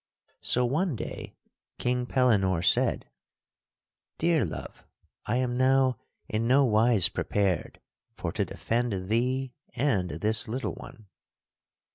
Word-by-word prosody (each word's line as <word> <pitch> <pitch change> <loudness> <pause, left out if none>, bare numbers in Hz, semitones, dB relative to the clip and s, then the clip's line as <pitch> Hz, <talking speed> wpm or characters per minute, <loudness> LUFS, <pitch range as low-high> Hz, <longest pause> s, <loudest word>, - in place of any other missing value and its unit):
So 125 0 +2
one 155 +5 0
day - - -7 0.4
King 125 0 -1
Pellinore 100 -10 +2
said: - - +2 1.1
"Dear 165 -1 +2
love, - - -8 0.4
I 115 - 0
am 125 -1 0
now 130 -1 +3 0.3
in 110 +2 -1
no 135 +3 +5
wise 110 -3 +4
prepared 100 -4 -1 0.4
for - - -3
to - - 0
defend 110 -5 -2
thee 125 +3 0 0.2
and 115 -9 +1
this 105 - +1
little 125 +5 -3
one. 120 -6 -12
120 Hz, 115 wpm, -28 LUFS, 105-130 Hz, 1.1 s, no